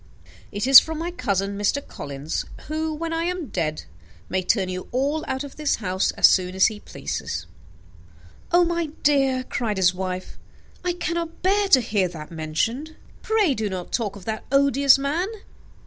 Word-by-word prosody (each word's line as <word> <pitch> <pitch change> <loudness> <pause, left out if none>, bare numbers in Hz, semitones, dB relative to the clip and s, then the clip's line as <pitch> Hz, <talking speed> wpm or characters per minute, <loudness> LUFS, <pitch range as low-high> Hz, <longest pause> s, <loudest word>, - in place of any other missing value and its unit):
It 205 +2 -2
is 270 0 +11
from 320 -1 -5
my 335 +2 -3
cousin, 200 - -1
Mr. 240 +8 0
Collins, 140 +2 -5 0.2
who, 315 +1 -2
when 330 +2 -4
I 330 +1 -1
am 355 -6 -3
dead, 155 -5 -2 0.5
may 185 - 0
turn 190 +1 +1
you 185 0 -5
all 280 +5 0
out 265 +1 -2
of 285 - -10
this 300 -2 +1
house 190 -2 -1
as - - +4
soon 185 0 +4
as 190 - +5
he 215 -1 0
pleases." - - -5 1.1
"Oh, 350 +1 +5
my 340 -1 -1 0.2
dear," 270 -3 +3
cried 230 -5 -2
his 180 -1 +4
wife, 185 0 -5 0.4
"I 360 -1 0
cannot 340 -1 -4
bear 400 +2 +3
to 265 -9 +6
hear 210 -5 0
that 160 -3 -9
mentioned. 225 - -2 0.3
Pray 430 -9 +2
do 220 -4 -2
not 185 -2 -6
talk 210 -5 -1
of 200 - -12
that 220 -1 -3
odious 275 0 +5
man. 295 +7 -1
255 Hz, 175 wpm, -23 LUFS, 190-315 Hz, 1.1 s, is